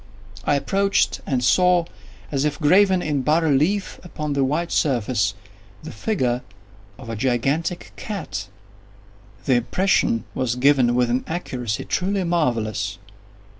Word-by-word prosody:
I 145 Hz, -, +3 dB
approached 195 Hz, +7 st, +1 dB
and 130 Hz, -3 st, 0 dB
saw, 180 Hz, +5 st, +4 dB, 0.5 s
as 135 Hz, -1 st, 0 dB
if 150 Hz, +1 st, -1 dB
graven 185 Hz, +4 st, +4 dB
in 145 Hz, -3 st, 0 dB
bas 155 Hz, +5 st, +2 dB
relief 160 Hz, +7 st, +1 dB
upon 150 Hz, -4 st, -4 dB
the 140 Hz, -1 st, +1 dB
white 155 Hz, +6 st, -1 dB
surface, 125 Hz, -6 st, +1 dB, 0.5 s
the -, -, -7 dB
figure 125 Hz, -, -1 dB, 0.6 s
of 130 Hz, -, -11 dB
a 115 Hz, -, -4 dB
gigantic 135 Hz, -, -1 dB
cat. 200 Hz, -, -5 dB, 1.0 s
The -, -, +3 dB
impression 120 Hz, -, +1 dB
was 125 Hz, -2 st, -1 dB
given 125 Hz, -2 st, +3 dB
with 125 Hz, -1 st, +2 dB
an 125 Hz, +2 st, 0 dB
accuracy 125 Hz, -10 st, -3 dB
truly 190 Hz, +1 st, -1 dB
marvellous. 115 Hz, -, -1 dB
145 Hz, 130 wpm, -22 LUFS, 125-175 Hz, 1.0 s, saw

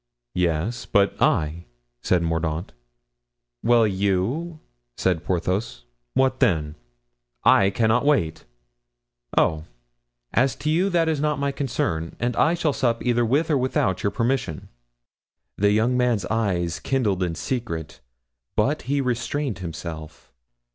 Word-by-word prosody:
"Yes, 90 Hz, +7 st, -1 dB
but 100 Hz, 0 st, +3 dB
I?" 80 Hz, +3 st, +1 dB, 0.4 s
said 90 Hz, -2 st, +2 dB
Mordaunt. 80 Hz, +1 st, -2 dB, 0.9 s
"Well, 120 Hz, -1 st, +4 dB
you," 105 Hz, -, -1 dB, 0.4 s
said 90 Hz, -3 st, 0 dB
Porthos, 90 Hz, -, -2 dB, 0.3 s
"what 130 Hz, 0 st, +2 dB
then?" 80 Hz, -, +2 dB, 0.7 s
"I 95 Hz, -, +5 dB
cannot 110 Hz, +4 st, +2 dB
wait." 110 Hz, -, +1 dB, 0.9 s
"Oh! 80 Hz, 0 st, +2 dB, 0.7 s
as 130 Hz, +2 st, +2 dB
to 155 Hz, -, -2 dB
you, 180 Hz, +5 st, +2 dB
that 170 Hz, -3 st, +2 dB
is 155 Hz, -3 st, 0 dB
not 150 Hz, -1 st, +1 dB
my 140 Hz, 0 st, 0 dB
concern, 85 Hz, -, -2 dB
and 120 Hz, 0 st, -1 dB
I 160 Hz, +7 st, +3 dB
shall 160 Hz, -4 st, 0 dB
sup 120 Hz, -3 st, 0 dB
either 120 Hz, -1 st, +2 dB
with 145 Hz, +8 st, +1 dB
or 140 Hz, -, +3 dB
without 105 Hz, -7 st, 0 dB
your 100 Hz, -, 0 dB
permission." 115 Hz, -, -2 dB, 0.9 s
The 100 Hz, +1 st, +3 dB
young 110 Hz, +4 st, +2 dB
man's 120 Hz, -6 st, +1 dB
eyes 90 Hz, -7 st, 0 dB
kindled 110 Hz, -9 st, 0 dB
in 85 Hz, -2 st, -1 dB
secret, 90 Hz, -, -4 dB, 0.6 s
but -, -, +1 dB
he 140 Hz, 0 st, +2 dB
restrained 125 Hz, 0 st, -2 dB
himself. 80 Hz, -2 st, -8 dB
110 Hz, 125 wpm, -24 LUFS, 85-130 Hz, 0.9 s, I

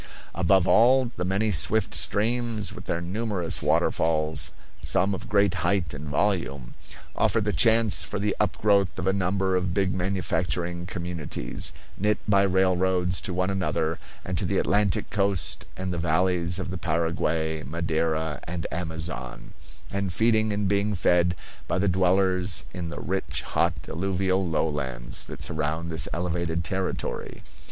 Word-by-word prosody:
Above 95 Hz, +1 st, +3 dB
all, 130 Hz, +3 st, +5 dB
the 115 Hz, -7 st, -5 dB
many 100 Hz, +4 st, +1 dB
swift 100 Hz, +5 st, +2 dB
streams 110 Hz, -1 st, 0 dB
with -, -, -10 dB
their 85 Hz, -, -2 dB
numerous 95 Hz, -1 st, -1 dB
waterfalls, 80 Hz, -1 st, +1 dB, 0.3 s
some 95 Hz, +3 st, +2 dB
of 105 Hz, +5 st, -6 dB
great 100 Hz, -3 st, +3 dB
height 85 Hz, -2 st, 0 dB
and 75 Hz, +1 st, -7 dB
volume, 75 Hz, -6 st, -1 dB, 0.4 s
offer -, -, +2 dB
the -, -, -1 dB
chance 110 Hz, -1 st, +4 dB
for 85 Hz, -, -3 dB
the 100 Hz, 0 st, 0 dB
upgrowth 100 Hz, -2 st, +2 dB
of 95 Hz, -, -3 dB
a 95 Hz, -, +2 dB
number 95 Hz, 0 st, +1 dB
of 90 Hz, -1 st, -1 dB
big 95 Hz, -2 st, +1 dB
manufacturing 90 Hz, -2 st, -1 dB
communities, 85 Hz, -8 st, -4 dB, 0.3 s
knit 105 Hz, +1 st, +2 dB
by 100 Hz, -2 st, +4 dB
rail 95 Hz, -1 st, +3 dB
roads 90 Hz, 0 st, +1 dB
to -, -, -3 dB
one 90 Hz, +2 st, 0 dB
another 85 Hz, -4 st, -1 dB, 0.3 s
and -, -, -1 dB
to -, -, -1 dB
the -, -, 0 dB
Atlantic 100 Hz, 0 st, +2 dB
coast 100 Hz, -3 st, 0 dB
and 95 Hz, 0 st, -3 dB
the 85 Hz, -, -3 dB
valleys 85 Hz, +1 st, +1 dB
of 95 Hz, -2 st, -4 dB
the 90 Hz, -, -4 dB
Paraguay, 80 Hz, -1 st, 0 dB
Madeira, 80 Hz, 0 st, -1 dB
and 85 Hz, -1 st, -4 dB
Amazon, 80 Hz, -6 st, -5 dB, 0.4 s
and 100 Hz, -2 st, -1 dB
feeding 110 Hz, +2 st, +2 dB
and 100 Hz, -1 st, 0 dB
being 100 Hz, +1 st, +1 dB
fed 90 Hz, -1 st, +3 dB, 0.3 s
by -, -, 0 dB
the 100 Hz, +2 st, +1 dB
dwellers 90 Hz, -2 st, +2 dB
in 85 Hz, -2 st, -4 dB
the -, -, -6 dB
rich, 70 Hz, -8 st, -2 dB
hot, -, -, +1 dB
alluvial 95 Hz, +1 st, 0 dB
lowlands 75 Hz, -8 st, -2 dB
that -, -, -7 dB
surround 80 Hz, +1 st, -2 dB
this 80 Hz, +1 st, 0 dB
elevated 85 Hz, -1 st, -1 dB
territory. 95 Hz, +2 st, -3 dB
90 Hz, 150 wpm, -26 LUFS, 85-100 Hz, 0.4 s, all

